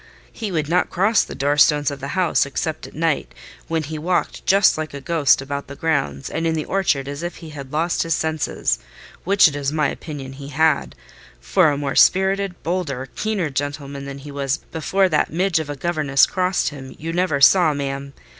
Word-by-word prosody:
He 215 -4 -5
would 155 -4 -1
not 180 +3 +1
cross 200 +5 +3
the - - -8
door 145 +2 0
stones 145 -1 +4
of 140 - -7
the 140 - -5
house, 180 -3 +3
except 155 +3 -3
at - - -15
night, 155 - -1 0.3
when 165 -1 -1
he 155 +1 -5
walked 175 +3 -1
just 195 +1 +5
like 155 -2 -5
a - - -5
ghost 140 -2 +2
about 140 +1 -5
the 140 - -9
grounds 75 - -1
and 165 +1 -2
in 160 - 0
the 155 - -2
orchard 160 -8 0
as 145 +2 -5
if 175 +1 -4
he 160 -3 -10
had 140 -3 -9
lost 165 +3 0
his 165 -1 +1
senses—which 160 - 0
it 145 - -3
is 140 -1 -1
my 150 -2 +1
opinion 140 -4 -7
he 140 +1 -9
had; 145 - +1 0.4
for - - +3
a 145 - -1
more 140 -1 -2
spirited, 190 0 +3
bolder, 150 -7 -2
keener 205 -8 -1
gentleman 140 0 -4
than 140 0 -7
he 145 +1 -10
was 140 0 -1
before 190 +4 +1
that 155 -4 +1
midge 180 +1 +1
of 155 -2 -5
a 145 - -3
governess 150 -3 +2
crossed 185 -5 0
him, 135 -3 -10
you 165 +2 -5
never 175 -5 +1
saw, 170 +3 +6
ma'am. 140 -1 -4
150 Hz, 200 wpm, -21 LUFS, 140-170 Hz, 0.4 s, saw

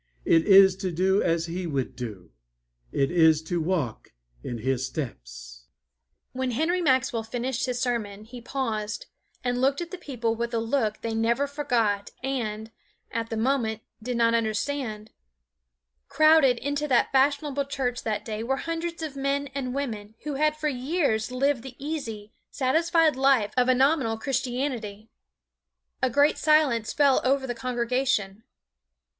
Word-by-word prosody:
It 165 -1 +4
is 195 -1 +8
to 190 -2 -3
do 190 +4 +2
as 165 -1 +1
He 175 +1 -4
would 135 -4 -2
do. 110 - -7 0.6
It 135 +2 +1
is 160 -3 +4
to 170 +1 -2
walk 155 -9 -2 0.3
in 120 - -4
His 130 +2 -1
steps." - - -7 0.6
When 260 0 -2
Henry 320 +9 0
Maxwell 260 -6 +2
finished 245 +3 -3
his 250 -1 -2
sermon, 220 -5 -2
he 240 +2 -10
paused 225 -5 -3 0.4
and 245 0 -1
looked 275 +1 +2
at 340 -1 -5
the 370 - -7
people 235 -8 -2
with 235 +1 -3
a - - +2
look 225 -2 -1
they 230 -1 -3
never 235 +5 +1
forgot 240 -8 0
and, 225 -5 -3 0.4
at 230 0 -3
the 225 - -3
moment, 225 -2 0 0.2
did 245 +2 -3
not 230 0 +3
understand. 220 0 -2 1.0
Crowded 310 -3 +5
into 285 +3 -2
that 255 -4 +2
fashionable 280 +1 +2
church 255 -3 -2
that 210 -2 -3
day 215 -1 -4
were 265 +4 -1
hundreds 330 +1 -4
of 300 -3 -5
men 275 +1 -1
and 265 -2 -3
women 220 -6 -4
who 300 - -3
had 305 +2 +1
for 305 - -1
years 260 -4 0
lived 270 0 +1
the 260 0 -10
easy, 235 -8 -5 0.2
satisfied 320 +3 +2
life 265 -5 +3
of 250 0 +3
a 255 - +5
nominal 265 -4 +2
Christianity. 245 -4 -3 0.9
A 255 - +3
great 285 +4 +3
silence 300 -8 +3
fell 280 -2 +3
over 270 +1 +2
the 245 - -3
congregation. 235 -4 -1
245 Hz, 150 wpm, -26 LUFS, 210-275 Hz, 1.0 s, is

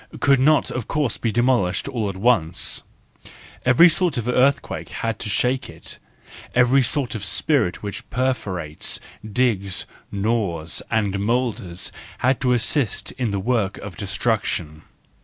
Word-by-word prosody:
—could 140 -1 +4
not 150 +2 +3
of 125 -4 -4
course 145 -7 0
be 115 - -1
demolished 120 -5 +1
all 115 -7 -2
at 95 - -5
once; 95 -6 +1 0.8
every 125 +8 +7
sort 175 -3 +1
of 120 -1 -2
earthquake 130 +2 +1
had 115 -2 -3
to - - -4
shake 125 +6 0
it, - - -9 0.6
every 125 +2 +5
sort 130 -1 0
of 110 - -5
spirit 125 - +1
which 100 -1 -6
perforates, 100 - -1 0.2
digs, 105 -4 0 0.3
gnaws 100 -6 0
and 100 -3 0
moulders 105 -5 -1 0.3
had 130 +1 +1
to 125 -1 +2
assist 120 0 +1
in 125 -4 -2
the 100 -1 -1
work 105 -2 0
of 100 -4 -8
destruction. 95 -6 -1
115 Hz, 140 wpm, -22 LUFS, 100-130 Hz, 0.8 s, every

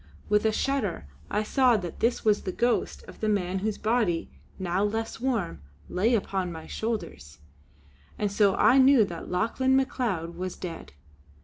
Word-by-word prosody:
With 210 +1 +3
a 220 - +4
shudder 215 - -1 0.2
I 210 - 0
saw 250 +1 +3
that 175 -5 -6
this 235 0 0
was 210 -1 +3
the 185 - -3
ghost 240 +5 0
of - - -13
the 215 - 0
man 190 -2 0
whose 210 +1 -2
body, 215 -7 0 0.3
now 185 +1 -1
less 225 +2 -2
warm, 230 - -1 0.3
lay 220 +7 +2
upon 190 -4 -2
my 160 -1 -8
shoulders; 210 - -5 0.8
and 205 -1 -1
so 200 -1 +3
I 265 - +5
knew 265 -4 +6
that 170 -3 -8
Lauchlane 230 +8 +1
Macleod 230 -11 -1
was 185 +1 -4
dead. 165 - -8
210 Hz, 165 wpm, -27 LUFS, 180-235 Hz, 0.8 s, knew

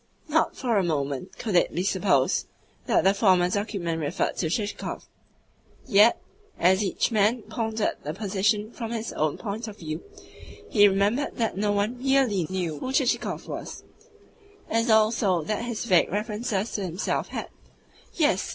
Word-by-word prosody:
Not - - +1
for 240 -4 0
a - - +1
moment 140 -5 -2
could 215 -5 -3
it 175 - +3
be 180 - 0
supposed 160 - +1 0.4
that - - +3
the 195 +1 +5
former 185 -4 +3
document 190 -5 -2
referred 150 +4 -1
to 160 - -1
Chichikov; 205 +4 -3 0.8
yet, 220 -1 +5 0.4
as 190 +3 +3
each 195 +4 0
man 220 +2 +2
pondered 220 0 -2
the 150 - -4
position 210 +2 0
from 230 -2 -6
his 225 -1 -4
own 155 -1 0
point 220 +2 -5
of 210 -1 -9
view, 155 0 -5 0.7
he 205 -2 +7
remembered 205 +8 +1
that 225 -2 0
no 205 +1 0
one 205 +4 -1
REALLY 255 - +2
knew 175 -5 -3
who 260 - -4
Chichikov 265 -2 0
was; - - -7 0.9
as 230 +1 +1
also 215 -5 +3
that 215 +7 -2
his 235 -1 -4
vague 180 -7 +3
references 210 +1 -2
to 205 - -3
himself 180 +2 -2
had - - -5 0.6
yes! 295 - +1
205 Hz, 155 wpm, -26 LUFS, 180-225 Hz, 0.9 s, he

